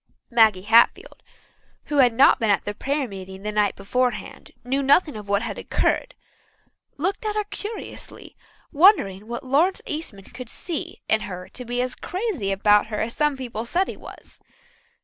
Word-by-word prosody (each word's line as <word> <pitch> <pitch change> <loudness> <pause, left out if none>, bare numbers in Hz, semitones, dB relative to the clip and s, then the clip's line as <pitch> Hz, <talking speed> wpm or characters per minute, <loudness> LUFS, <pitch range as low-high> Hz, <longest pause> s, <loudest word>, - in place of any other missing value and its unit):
Maggie 220 -5 +4
Hatfield, 230 +3 +3 0.6
who 295 - -2
had 250 -3 +6
not 260 +5 +5
been 225 -2 0
at 205 +1 0
prayer 280 0 -1
meeting 190 -1 -9
the 210 - -2
night 210 -2 +1
beforehand 250 +5 -2 0.2
knew 270 +3 0
nothing 285 +2 +3
of 210 -1 -9
what 200 +2 +1
had 235 - -5
occurred, - - -1 0.8
looked 385 - -2
at 425 -1 -2
her 425 - +1
curiously, 420 +2 -8 0.4
wondering 280 - +4
what 240 +4 -6
Lawrence 310 +9 +2
Eastman 300 -11 -5
could 245 +3 -10
see 335 +3 -4
in 220 - +2
her 180 -3 -7
to 250 - -9
be 245 +1 -1
as 255 0 -1
crazy 360 - -3
about 205 +2 +3
her 215 -1 -4
as 230 +1 -2
some 295 -2 +1
people 240 -4 -5
said 350 +11 0
he - - -6
was. - - -13
245 Hz, 170 wpm, -23 LUFS, 210-300 Hz, 0.8 s, had